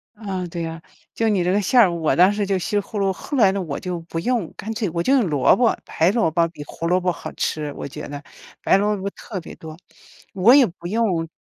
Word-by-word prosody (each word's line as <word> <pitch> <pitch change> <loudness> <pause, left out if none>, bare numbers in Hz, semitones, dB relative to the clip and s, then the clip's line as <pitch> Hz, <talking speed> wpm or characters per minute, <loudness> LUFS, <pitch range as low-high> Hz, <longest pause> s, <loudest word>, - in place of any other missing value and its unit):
啊， 195 -4 -4
对 170 0 -5
呀。 165 0 -6 0.3
就 225 - 0
你 195 -4 +1
这 180 - +1
个 205 +2 +2
馅 245 +6 +3
儿 200 -7 +6
我 165 -2 0
当 180 +3 +6
时 205 0 -1
就 195 -1 0
西 205 +3 -2
葫 205 +1 -7
芦 195 -1 +1
后 280 +9 -5
来 200 -5 +5
呢 195 0 -2
我 155 -5 -4
就 180 -3 -4
不 165 0 -5
用， 230 -1 -1
干 225 +2 -5
脆 215 -3 -2
我 170 +1 -1
就 260 - +2
用 250 -8 +3
萝 145 -4 +4
卜。 240 -2 +2
白 165 +4 +1
萝 225 -7 +2
卜 170 +1 +2
比 165 -3 -10
胡 165 +2 -5
萝 180 +1 +3
卜 180 0 0
好 - - -8
吃， 150 -1 -2
我 - - -6
觉 - - -8
得。 145 +1 -8 0.4
白 - - +4
萝 210 +1 +1
卜 195 +1 -3
特 205 -5 -7
别 170 - -10
多， 160 -1 -10 0.6
我 195 +6 +5
也 280 -3 +7
不 175 -3 -8
用 190 -6 0
185 Hz, 275 characters per minute, -22 LUFS, 165-210 Hz, 0.6 s, 也